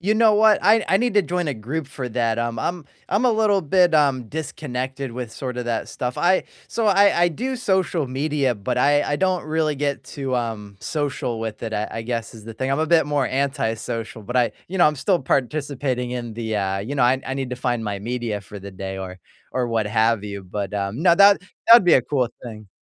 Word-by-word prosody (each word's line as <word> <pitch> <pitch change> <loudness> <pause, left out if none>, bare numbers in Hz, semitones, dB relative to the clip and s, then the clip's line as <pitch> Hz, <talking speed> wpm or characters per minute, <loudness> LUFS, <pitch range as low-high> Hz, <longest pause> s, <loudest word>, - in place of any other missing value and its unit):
You 205 +5 +1
know 220 -1 +5
what? 215 0 +5
I 220 +2 +4
I 190 - +4
need 240 0 0
to 205 - +5
join 175 -1 -2
a 140 - -2
group 135 +7 -5
for 130 -2 -5
that, 115 -1 0
um, 120 0 -2
I'm 175 -3 -3 0.2
I'm 210 +6 +1
a 245 - +4
little 215 -3 +2
bit, 175 +1 +3
um, 130 -6 +2
disconnected 135 -3 -4
with 120 -2 -6
sorta 125 -2 -5
that 115 -1 -2
stuff, 125 0 -4
I 185 +2 +2 0.2
So 230 -2 -1
I 200 -3 +4
I - - +6
do 255 - -3
social 190 - 0
media, 135 -1 0
but 120 +5 -3
I 145 +2 +4
I 145 - -1
don't 185 0 +1
really 155 -1 0
get 140 0 -2
too, 135 -3 -3
um, 105 -4 -4
social 140 -7 -3
with 110 0 -5
it, 110 - -4
I 105 - -2
I 115 - -5
guess 115 -1 -4
is 110 -2 -13
the 115 -1 -8
thing, 130 +4 -2
I'm 135 - +1
a 160 - +1
bit 165 -2 +4
more 145 -3 +1
antisocial, 115 -4 -2
but 125 +5 -4
I 120 -4 +2 0.2
you 190 - -4
know, 175 - +6
I'm 150 - +2
still 180 +5 +1
participating 135 -2 -1
in 120 -2 -4
the, 110 -2 -3
uh 95 -1 -1
you 110 +9 -4
know, 135 - +1
I 130 +2 +3
I 135 - -3
need 135 -2 -4
to 125 - -4
find 120 -2 -1
my 100 -2 -3
media 115 -1 -3
for 100 0 -11
the 100 +1 -8
day 95 0 -6
or 95 -1 -7 0.3
or 125 -1 -1
what 115 -2 0
have 110 0 +2
you, 100 -2 -7
but, 100 +1 -5
um, 100 +8 -3
no, 175 -2 +6
that 200 0 +7
that 210 +4 +4
would 235 - +7
be 175 - +6
a 125 - +4
cool 130 -3 0 0.2
thing. 110 -4 -9
130 Hz, 235 wpm, -22 LUFS, 115-160 Hz, 0.3 s, that